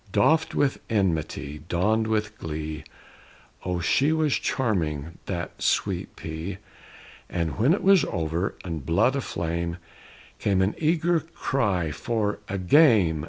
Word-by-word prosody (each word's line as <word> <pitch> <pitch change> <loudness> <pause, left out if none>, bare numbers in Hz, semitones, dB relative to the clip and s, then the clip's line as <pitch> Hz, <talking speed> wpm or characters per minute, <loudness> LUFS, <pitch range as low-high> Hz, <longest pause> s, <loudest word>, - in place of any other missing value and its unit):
Doffed 155 +11 +3
with 140 -2 +1
enmity, 80 - -1
donned 110 +6 +2
with 110 -1 -1
glee, 75 -1 -5 0.8
Oh, 90 -1 -1
she 140 - +3
was 155 -3 +2
charming, 85 - -1
that 85 -3 -4
Sweet - - 0
P! 80 +4 -5 0.7
And 85 +2 -2
when 125 +7 +4
it 190 - +1
was 195 -4 +6
over, 85 0 -2
and 80 -5 -4
blood 85 - +2
aflame, 85 -8 -2 0.6
Came 95 -2 +2
an 100 - +1
eager 165 +1 +2
cry 105 - -1
for 105 - -1
"A 100 - -2
game!" 95 - +5
95 Hz, 125 wpm, -25 LUFS, 85-130 Hz, 0.8 s, was